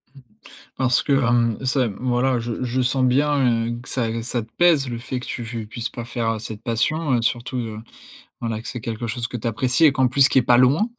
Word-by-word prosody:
Mmh. - - -13 0.6
Parce 125 -1 +2
que, 145 - 0
hem, 120 -4 +2
c'est, 130 -1 +1
mmh, 100 - -8
voilà, 125 0 +1
je 115 +1 -4
je 125 +1 -1
sens 130 +1 +1
bien, 130 -3 +2
heu, - - -7
que 125 - -13
ça 115 -3 -1
g 115 0 -3
ça 120 0 -2
te 110 - -15
pèse, 165 -6 +4
le 120 -1 -4
fait 125 +2 -4
que - - -9
tu 120 - -5
fu 115 -1 -5
puisses 115 +2 -5
pas 120 - -7
faire, 115 -1 -2
heu, - - -4
cette 110 0 -8
passion, 135 +6 0
heu, 120 - +1
surtout 120 +2 -1
de, 115 -3 -4 0.7
voilà, 115 -2 -3
que - - -10
c'est 125 - -5
quelque 115 +1 -4
chose 115 +1 -3
que 120 - -5
tu 115 - -4
apprécies 125 +7 +2
et 150 - +7
qu'en 130 -1 +2
plus, 135 +2 +4
qui - - +3
est - - +2
pas 120 0 +4
loin, 140 - +4
120 Hz, 255 wpm, -22 LUFS, 115-130 Hz, 0.7 s, et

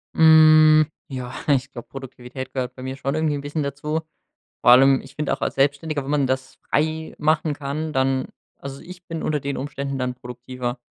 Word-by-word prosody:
Hm, 155 -1 +7 0.2
ja, 125 -2 -6
ich 140 -1 +1
glaub, 120 -3 -9
Produktivität 130 -1 -8
gehört 125 -1 -3
bei 130 - -9
mir 130 0 -4
schon 135 +1 -2
irgendwie 155 -2 0
'n 140 - -4
bisschen 145 +2 -3
dazu. 150 +3 -3 0.6
Vor - - +6
allem 135 +2 +7
ich 135 0 -14
find 150 -1 -2
auch - - -1
als - - -2
Selbstständiger, 145 +1 0
wenn 140 - -5
man 145 -2 +2
das 130 0 -3
frei 160 +1 -1
machen 155 0 +1
kann, 150 +2 -4
dann 130 -1 0 0.3
also 140 0 -9
ich 180 0 -12
bin 165 -2 -5
unter 150 -1 -1
den 140 0 -3
Umständen 140 0 -4
dann 125 -1 -2
produktiver, 125 0 -6
140 Hz, 190 wpm, -22 LUFS, 130-155 Hz, 0.6 s, Hm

